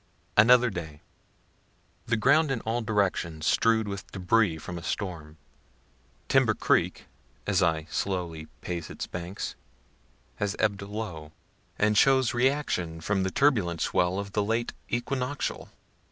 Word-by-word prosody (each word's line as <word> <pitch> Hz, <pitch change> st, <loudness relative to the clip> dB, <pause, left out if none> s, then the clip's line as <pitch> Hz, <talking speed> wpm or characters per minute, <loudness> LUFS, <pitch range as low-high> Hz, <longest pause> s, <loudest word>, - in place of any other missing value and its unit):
Another 120 Hz, +3 st, +6 dB
Day. 80 Hz, -5 st, -6 dB, 1.1 s
The 115 Hz, -, +1 dB
ground 145 Hz, +7 st, +4 dB
in 130 Hz, -4 st, -1 dB
all 115 Hz, +2 st, -1 dB
directions 90 Hz, -7 st, -1 dB
strew'd 110 Hz, +2 st, +3 dB
with 100 Hz, -1 st, -6 dB
débris 95 Hz, -2 st, +2 dB
from 85 Hz, +2 st, -6 dB
a -, -, -11 dB
storm. 85 Hz, -4 st, -4 dB, 0.9 s
Timber -, -, +3 dB
creek, -, -, +1 dB, 0.4 s
as -, -, +2 dB
I 80 Hz, -1 st, +1 dB
slowly 85 Hz, -5 st, -3 dB
pace 85 Hz, -2 st, -4 dB
its -, -, -5 dB
banks, 85 Hz, +3 st, -5 dB, 0.8 s
has 105 Hz, -1 st, -1 dB
ebb'd 100 Hz, -2 st, +1 dB
low, 100 Hz, -7 st, -6 dB, 0.4 s
and 105 Hz, 0 st, +2 dB
shows 130 Hz, +1 st, +4 dB
reaction 120 Hz, -, 0 dB
from 95 Hz, +4 st, 0 dB
the 95 Hz, -, 0 dB
turbulent 95 Hz, -, +2 dB
swell 90 Hz, +4 st, +1 dB
of 100 Hz, 0 st, -4 dB
the 105 Hz, -, +1 dB
late 115 Hz, +3 st, -1 dB, 0.2 s
equinoctial. 130 Hz, +3 st, -2 dB
100 Hz, 130 wpm, -27 LUFS, 85-115 Hz, 1.1 s, Another